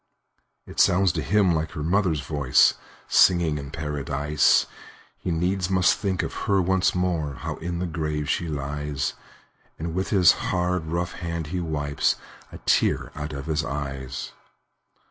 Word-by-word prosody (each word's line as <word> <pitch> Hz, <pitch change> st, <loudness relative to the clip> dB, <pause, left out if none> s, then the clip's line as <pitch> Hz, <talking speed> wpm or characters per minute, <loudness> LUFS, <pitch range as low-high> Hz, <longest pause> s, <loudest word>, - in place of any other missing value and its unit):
It -, -, -8 dB
sounds 95 Hz, 0 st, +4 dB
to -, -, -2 dB
him 100 Hz, -1 st, +3 dB
like 80 Hz, 0 st, -2 dB
her 75 Hz, -, -4 dB
mother's 85 Hz, -3 st, +1 dB
voice, 70 Hz, -2 st, +3 dB, 0.3 s
Singing 85 Hz, -5 st, +4 dB
in 70 Hz, -1 st, -7 dB
Paradise! 75 Hz, -1 st, +1 dB, 0.5 s
He -, -, -4 dB
needs 90 Hz, +2 st, 0 dB
must 95 Hz, -2 st, +4 dB
think 95 Hz, -3 st, -1 dB
of -, -, -4 dB, 0.2 s
her 100 Hz, -1 st, +4 dB
once 95 Hz, 0 st, +2 dB
more 85 Hz, -6 st, -1 dB
How -, -, -5 dB
in 85 Hz, +1 st, -4 dB
the 90 Hz, -, -2 dB
grave 75 Hz, -3 st, -3 dB
she 85 Hz, -, -1 dB
lies; 75 Hz, -1 st, -3 dB, 0.6 s
And 80 Hz, +1 st, -4 dB
with 95 Hz, +2 st, -2 dB
his 95 Hz, -5 st, +6 dB
hard, 90 Hz, -2 st, -1 dB
rough 85 Hz, +1 st, -2 dB
hand 85 Hz, -2 st, -4 dB
he 90 Hz, -, 0 dB
wipes 75 Hz, -4 st, 0 dB, 0.4 s
A -, -, -8 dB
tear -, -, +2 dB
out 75 Hz, +1 st, -5 dB
of 70 Hz, -2 st, -6 dB
his 80 Hz, -1 st, 0 dB
eyes. 70 Hz, -1 st, -5 dB
80 Hz, 155 wpm, -25 LUFS, 75-90 Hz, 0.6 s, his